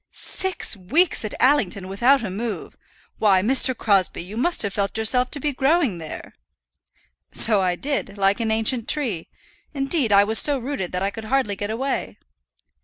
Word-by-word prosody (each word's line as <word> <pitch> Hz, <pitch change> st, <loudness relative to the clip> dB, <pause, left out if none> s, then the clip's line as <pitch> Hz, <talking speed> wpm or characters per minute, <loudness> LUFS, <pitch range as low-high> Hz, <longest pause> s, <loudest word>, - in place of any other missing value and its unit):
"Six 380 Hz, -10 st, -1 dB
weeks 285 Hz, -, 0 dB
at 210 Hz, -, -5 dB
Allington 225 Hz, -9 st, +1 dB
without 240 Hz, +8 st, +2 dB
a 200 Hz, -, -5 dB
move! 220 Hz, +3 st, -6 dB, 0.4 s
Why, 195 Hz, -4 st, +3 dB
Mr. 260 Hz, +1 st, +4 dB
Crosbie, 195 Hz, -6 st, +1 dB
you 190 Hz, +4 st, -10 dB
must 345 Hz, +10 st, +1 dB
have 200 Hz, -1 st, -4 dB
felt 200 Hz, 0 st, -3 dB
yourself 250 Hz, +3 st, +3 dB
to 290 Hz, -, -4 dB
be 290 Hz, +1 st, -2 dB
growing 270 Hz, -, 0 dB
there." 160 Hz, -1 st, -9 dB, 1.0 s
"So 215 Hz, -3 st, +4 dB
I 180 Hz, -1 st, 0 dB
did 240 Hz, -4 st, -4 dB
like 195 Hz, +2 st, +1 dB
an 225 Hz, -1 st, -2 dB
ancient 225 Hz, +2 st, +1 dB
tree. 230 Hz, -, 0 dB, 0.5 s
Indeed, 275 Hz, -3 st, 0 dB
I 200 Hz, 0 st, +6 dB
was 220 Hz, +2 st, +3 dB
so 290 Hz, -2 st, +3 dB
rooted 245 Hz, -8 st, -5 dB
that 180 Hz, +1 st, -2 dB
I 200 Hz, -, -1 dB
could 225 Hz, -1 st, -9 dB
hardly 245 Hz, -4 st, -1 dB
get 205 Hz, +1 st, -5 dB
away." 265 Hz, +5 st, -4 dB
220 Hz, 175 wpm, -21 LUFS, 200-270 Hz, 1.0 s, I